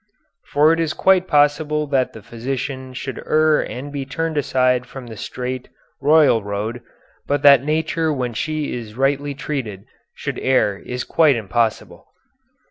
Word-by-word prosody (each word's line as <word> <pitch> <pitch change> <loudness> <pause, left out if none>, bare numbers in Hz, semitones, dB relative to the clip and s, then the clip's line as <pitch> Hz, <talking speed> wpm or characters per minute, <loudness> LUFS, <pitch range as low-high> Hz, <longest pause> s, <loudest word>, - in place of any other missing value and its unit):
"For 150 +3 +4
it 165 - -1
is 165 -2 0
quite 185 -1 +3
possible 150 +1 +2
that 135 -3 0
the 110 - -11
physician 130 +3 -5
should 130 +1 -5
err 155 0 +3
and 140 +3 -6
be 140 -1 -4
turned 165 +4 -3
aside 125 -3 +1
from 130 0 -9
the 115 -2 -9
straight 125 +4 -5 0.3
(royal) 145 -5 +5
road, 105 +4 -4 0.5
but 145 0 0
that 140 -3 +7
nature 160 +1 0
when 125 -4 -2
she 155 +5 -2
is 115 -2 -7
rightly 140 +1 0
treated 115 -10 -5 0.3
should - - -5
err 105 -7 +1
is 125 0 -5
quite 155 -5 +3
impossible." 115 +1 -2
135 Hz, 150 wpm, -20 LUFS, 125-150 Hz, 0.5 s, that